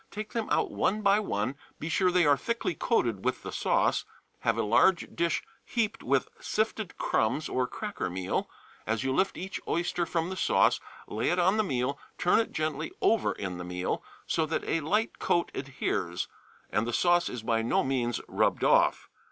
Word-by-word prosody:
Take 215 Hz, 0 st, -6 dB
them 230 Hz, -2 st, -2 dB
out -, -, +1 dB
one 215 Hz, +2 st, 0 dB
by 200 Hz, +1 st, +5 dB
one; 125 Hz, -, -1 dB, 0.2 s
be 155 Hz, -, -4 dB
sure 185 Hz, +3 st, +3 dB
they 180 Hz, -2 st, +3 dB
are 145 Hz, -1 st, +6 dB
thickly 235 Hz, -, -2 dB
coated 115 Hz, -, 0 dB
with -, -, -1 dB
the -, -, -5 dB
sauce; -, -, +2 dB, 0.4 s
have -, -, +1 dB
a -, -, +1 dB
large 170 Hz, -, +3 dB
dish 170 Hz, 0 st, +1 dB, 0.2 s
heaped 225 Hz, -3 st, -1 dB
with -, -, +1 dB
sifted 220 Hz, -, -2 dB
crumbs 125 Hz, +8 st, +1 dB
or 130 Hz, -1 st, 0 dB
cracker 210 Hz, -, -4 dB
meal; 90 Hz, +1 st, -2 dB, 0.4 s
as 110 Hz, +3 st, 0 dB
you 130 Hz, 0 st, 0 dB
lift 190 Hz, +7 st, +1 dB
each 190 Hz, +2 st, -5 dB
oyster 175 Hz, 0 st, 0 dB
from 165 Hz, +2 st, -1 dB
the -, -, -3 dB
sauce 185 Hz, -, +3 dB, 0.3 s
lay 110 Hz, +2 st, -1 dB
it 175 Hz, -, +1 dB
on 185 Hz, +4 st, +3 dB
the 215 Hz, -, +3 dB
meal, 135 Hz, -5 st, -1 dB, 0.2 s
turn 180 Hz, -, +4 dB
it 230 Hz, -, -1 dB
gently 155 Hz, 0 st, -2 dB
over 225 Hz, -2 st, +3 dB
in 90 Hz, -3 st, -5 dB
the -, -, -4 dB
meal, 90 Hz, +1 st, -2 dB, 0.2 s
so 160 Hz, -1 st, 0 dB
that 160 Hz, -, -1 dB
a 165 Hz, -, +1 dB
light 210 Hz, +9 st, 0 dB
coat 170 Hz, -, +1 dB
adheres, 95 Hz, -10 st, -2 dB, 0.4 s
and 105 Hz, +4 st, +1 dB
the 120 Hz, -, -2 dB
sauce 175 Hz, +3 st, +3 dB
is 120 Hz, -3 st, -6 dB
by 115 Hz, 0 st, +1 dB
no 115 Hz, -, +2 dB
means 125 Hz, -3 st, 0 dB
rubbed -, -, +1 dB
off. -, -, +4 dB
160 Hz, 190 wpm, -29 LUFS, 120-195 Hz, 0.4 s, are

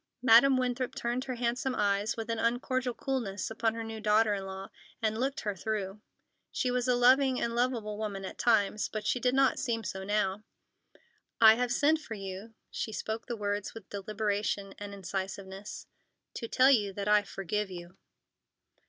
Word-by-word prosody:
Madam 260 Hz, +2 st, +7 dB
Winthrop 255 Hz, 0 st, -1 dB
turned 240 Hz, +2 st, -2 dB
her 255 Hz, -, -3 dB
handsome 245 Hz, +2 st, -1 dB
eyes 205 Hz, +1 st, +1 dB
with 225 Hz, -1 st, -4 dB
an 230 Hz, -, -2 dB
uncordial 245 Hz, +1 st, 0 dB
coolness 225 Hz, -8 st, -3 dB
upon 225 Hz, 0 st, 0 dB
her 230 Hz, -, -4 dB
new 225 Hz, -1 st, -6 dB
daughter 215 Hz, 0 st, +3 dB
in 195 Hz, -1 st, -4 dB
law, 190 Hz, 0 st, -7 dB, 0.3 s
and 220 Hz, -1 st, 0 dB
looked 270 Hz, +4 st, -1 dB
her 205 Hz, -2 st, -2 dB
through. 205 Hz, 0 st, -3 dB, 0.5 s
She 250 Hz, -, 0 dB
was 250 Hz, 0 st, 0 dB
a 250 Hz, -, +4 dB
loving 255 Hz, +1 st, +4 dB
and 235 Hz, -, -1 dB
lovable 235 Hz, -4 st, -1 dB
woman 200 Hz, -3 st, -4 dB
at -, -, -8 dB
times, 215 Hz, -3 st, +2 dB
but 215 Hz, -1 st, -5 dB
she 250 Hz, -, +1 dB
did 250 Hz, +1 st, +1 dB
not 270 Hz, -1 st, +3 dB
seem 225 Hz, -2 st, -1 dB
so 190 Hz, -1 st, -5 dB
now. 205 Hz, 0 st, 0 dB, 1.0 s
"I 220 Hz, -1 st, +9 dB
have 245 Hz, +1 st, -1 dB
sent 305 Hz, +5 st, +3 dB
for 225 Hz, -, -7 dB
you"—she 200 Hz, +3 st, -7 dB
spoke 220 Hz, +1 st, -4 dB
the 240 Hz, -2 st, -3 dB
words 205 Hz, 0 st, -2 dB
with 220 Hz, -4 st, -11 dB
deliberation 205 Hz, -1 st, -2 dB
and 205 Hz, 0 st, -6 dB
incisiveness—"to 195 Hz, +4 st, -7 dB
tell 260 Hz, +3 st, +5 dB
you 205 Hz, -6 st, +2 dB
that 200 Hz, +1 st, -4 dB
I 210 Hz, 0 st, +5 dB
forgive 200 Hz, +1 st, -3 dB
you." 175 Hz, 0 st, -9 dB
220 Hz, 170 wpm, -30 LUFS, 200-245 Hz, 1.0 s, I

